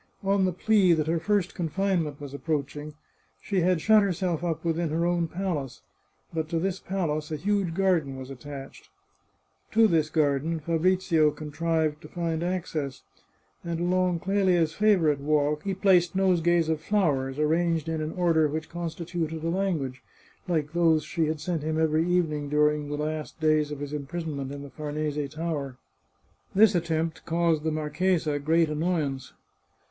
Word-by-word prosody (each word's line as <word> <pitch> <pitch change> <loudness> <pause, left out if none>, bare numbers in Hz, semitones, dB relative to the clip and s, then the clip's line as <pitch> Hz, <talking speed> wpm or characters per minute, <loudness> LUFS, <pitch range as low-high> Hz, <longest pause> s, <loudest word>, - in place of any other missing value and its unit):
On 195 0 +2
the 185 - +1
plea 190 0 +3
that 155 -2 +1
her 165 +1 0
first 200 +1 0
confinement 170 -3 -1
was 140 -2 -8
approaching, 150 0 -3 0.4
she 195 -2 -1
had 180 0 +2
shut 215 +2 +6
herself 180 -4 -1
up 170 -1 -2
within 165 0 0
her 165 +3 0
own 175 -1 +1
palace; 165 -7 -4 0.5
but 160 -1 -2
to 165 - -1
this 190 +2 -1
palace 160 -5 -2
a - - -1
huge 190 +1 0
garden 170 -8 +1
was 130 0 -8
attached. 135 +1 -9 0.8
To 225 0 +6
this 160 -5 +2
garden 155 +1 +1
Fabrizio 165 0 +2
contrived 155 +1 -1
to - - -10
find 165 -2 -2
access, 165 -6 -3 0.6
and 170 -1 -3
along 180 -1 +1
Clelia's 185 -5 +2
favourite 180 -9 +3
walk 150 +1 +1
he 195 -1 -2
placed 185 -2 +3
nosegays 175 -3 +3
of 160 -1 -1
flowers, 145 -9 0
arranged 165 +1 +1
in 160 -1 -2
an 155 +1 -3
order 165 -4 +3
which 155 +1 -4
constituted 170 -1 -4
a 165 - 0
language, 165 -9 -1 0.5
like 155 -3 -1
those 165 -3 +3
she 160 +1 -1
had 155 0 -2
sent 165 0 -2
him 155 +1 -1
every 160 +1 +2
evening 155 -5 0
during 150 0 +2
the 145 - -3
last 155 +1 -4
days 155 -1 +2
of 145 - -5
his 145 0 -5
imprisonment 145 -2 -4
in 140 0 -7
the 140 - -10
Farnese 150 0 -3
Tower. 150 -5 -4 0.8
This 215 +1 +6
attempt 165 -2 -1
caused 165 -2 +2
the 160 +1 -1
marchesa 155 0 0
great 160 +3 +3
annoyance. 150 -4 -2
160 Hz, 160 wpm, -27 LUFS, 150-175 Hz, 0.8 s, shut